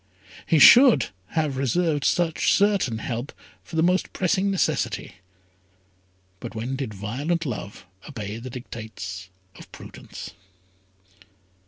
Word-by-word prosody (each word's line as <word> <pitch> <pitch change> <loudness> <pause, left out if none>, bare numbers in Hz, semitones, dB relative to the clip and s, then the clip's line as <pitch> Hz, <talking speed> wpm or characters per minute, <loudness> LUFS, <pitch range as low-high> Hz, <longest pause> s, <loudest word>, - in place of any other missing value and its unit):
He 165 - +3
should 245 - +8 0.3
have 150 -4 0
reserved 145 +2 0
such 170 -2 +1
certain 195 - +2
help 120 +4 -4 0.3
for 165 - -11
the 160 - +2
most 180 +2 +1
pressing 190 +2 +1
necessity; 135 - -1 1.2
but 110 - -8
when 120 +4 -3
did 135 -5 -4
violent 135 - -3
love 105 -7 -6 0.2
obey 110 -6 -6
the 130 +2 -8
dictates 110 -6 -8 0.3
of - - -14
prudence? - - -10
135 Hz, 115 wpm, -24 LUFS, 110-170 Hz, 1.2 s, should